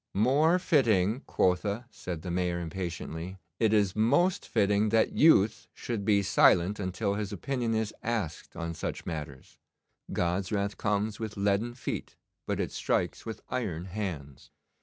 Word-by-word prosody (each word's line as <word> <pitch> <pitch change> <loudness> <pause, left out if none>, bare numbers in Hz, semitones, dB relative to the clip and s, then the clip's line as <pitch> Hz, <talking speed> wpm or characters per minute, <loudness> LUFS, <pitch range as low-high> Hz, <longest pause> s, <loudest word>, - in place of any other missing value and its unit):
'More 140 - +4
fitting, 115 - +2
quotha!' 100 +5 +1
said 85 -3 -6
the 90 - -4
Mayor 90 0 0
impatiently. 85 +1 -5 0.2
'It 110 -2 +3
is 100 -3 +2
most 175 - +2
fitting 105 +1 +2
that 110 +1 +3
youth 110 -9 +4
should 115 -4 -4
be 100 -1 +3
silent 95 +1 +4
until 95 +1 -1
his 105 -1 -3
opinion 125 -5 -2
is 110 -1 -1
asked 110 -9 -3
on 85 0 -4
such - - -5
matters. 75 -5 -7 0.5
God's 90 +2 -1
wrath 100 -1 -1
comes 105 0 -1
with 110 -1 -5
leaden 100 +4 +1
feet, 130 - -5 0.3
but - - -1
it - - -1
strikes - - -1
with 110 - -6
iron 90 -9 -3
hands. 85 -9 -6
100 Hz, 145 wpm, -29 LUFS, 90-110 Hz, 0.5 s, More